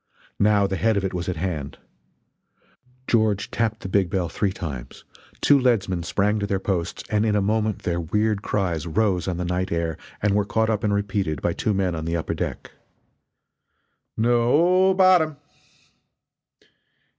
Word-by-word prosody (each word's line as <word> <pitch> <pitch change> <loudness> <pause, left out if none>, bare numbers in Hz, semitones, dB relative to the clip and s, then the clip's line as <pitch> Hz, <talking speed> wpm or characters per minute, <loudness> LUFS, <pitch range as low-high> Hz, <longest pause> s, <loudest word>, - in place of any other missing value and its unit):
Now 100 -1 +4
the 95 -1 -2
head 110 +5 +2
of 100 - 0
it 95 - -3
was 90 0 -3
at 90 - -2
hand. 80 -4 -4 1.3
George 110 -3 +1
tapped 110 -1 -1
the - - -5
big 95 -1 +1
bell 90 -2 -1
three 100 +2 -1
times, 70 -10 -7 0.4
two 145 - +5
leadsmen 100 -8 +1
sprang 105 +5 0
to 100 - -2
their 100 - 0
posts, 95 -3 -2
and 105 0 +2
in 110 -2 +1
a - - +3
moment 110 0 0
their 85 -1 -1
weird 105 +4 0
cries 90 -6 -2
rose 90 0 0
on 90 -2 -2
the 90 - -2
night 90 +2 -2
air 85 -2 -2 0.2
and 105 -1 +1
were 105 0 +2
caught 110 +2 0
up 110 0 -1
and 105 -1 +1
repeated 100 -6 -1
by - - -1
two 105 - -1
men 95 -2 0
on 80 -1 -4
the 85 +1 -1
upper 80 - -3
deck: - - -5 1.5
"No 145 +12 +3
o - - +3
bottom!" 180 -5 +4
100 Hz, 170 wpm, -23 LUFS, 90-110 Hz, 1.5 s, two